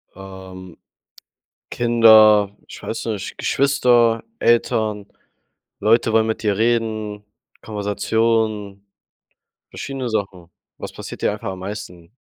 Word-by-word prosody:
Ähm, 95 Hz, -2 st, -11 dB, 0.9 s
Kinder 110 Hz, -3 st, +5 dB
ich -, -, -12 dB
weiß 110 Hz, -, -5 dB
nicht, 105 Hz, -3 st, -4 dB
Geschwister, 120 Hz, -4 st, +2 dB, 0.2 s
Eltern, 110 Hz, -3 st, +1 dB, 0.7 s
Leute 115 Hz, +1 st, +2 dB
wollen 110 Hz, 0 st, +3 dB
mit 110 Hz, 0 st, -3 dB
dir 105 Hz, -2 st, 0 dB
reden. 110 Hz, -2 st, -1 dB, 0.4 s
Konversation, 105 Hz, -1 st, -1 dB, 0.9 s
verschiedene 135 Hz, -2 st, -5 dB
Sachen. 95 Hz, -6 st, -4 dB, 0.3 s
Was -, -, -7 dB
passiert -, -, -9 dB
dir -, -, +1 dB
einfach -, -, -5 dB
am 95 Hz, -1 st, -8 dB
meisten? 95 Hz, -3 st, -8 dB
110 Hz, 105 wpm, -20 LUFS, 100-115 Hz, 0.9 s, Kinder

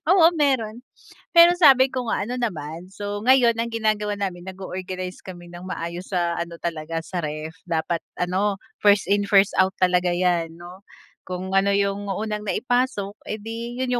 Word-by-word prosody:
Oo 335 Hz, -4 st, +7 dB
meron. 250 Hz, -5 st, 0 dB, 0.5 s
Pero 340 Hz, +1 st, +9 dB
sabi 265 Hz, -5 st, +6 dB
ko 255 Hz, -2 st, -3 dB
nga -, -, 0 dB
ano 250 Hz, +4 st, -4 dB
naman, 170 Hz, -6 st, -4 dB
so, 205 Hz, +1 st, -5 dB
ngayon 245 Hz, -3 st, +5 dB
ang 230 Hz, -, 0 dB
ginagawa 215 Hz, -2 st, 0 dB
namin 190 Hz, -3 st, -4 dB
nag-o-organize 185 Hz, -1 st, -6 dB
kami 175 Hz, -2 st, -11 dB
ng 175 Hz, +1 st, -9 dB
maayos 175 Hz, 0 st, -5 dB
sa 170 Hz, -1 st, 0 dB
ano 170 Hz, 0 st, -4 dB
talaga 165 Hz, -1 st, -3 dB
sa 180 Hz, +1 st, -4 dB
ref, 155 Hz, +1 st, -5 dB
dapat 165 Hz, 0 st, -1 dB, 0.2 s
ano, 190 Hz, +3 st, 0 dB, 0.2 s
1st 205 Hz, 0 st, +5 dB
in, 205 Hz, 0 st, +2 dB
1st 200 Hz, -1 st, +5 dB
out 185 Hz, 0 st, +3 dB
talaga 180 Hz, -1 st, +2 dB
'yan 175 Hz, -2 st, 0 dB
'no. 175 Hz, +2 st, -11 dB, 0.5 s
Kung 185 Hz, +1 st, -5 dB
ano 195 Hz, +1 st, +3 dB
yung 200 Hz, 0 st, 0 dB
unang 210 Hz, +1 st, -3 dB
naipasok 245 Hz, -4 st, -1 dB
edi 225 Hz, +3 st, -5 dB
yun 250 Hz, -1 st, 0 dB
195 Hz, 165 wpm, -23 LUFS, 175-220 Hz, 0.5 s, Pero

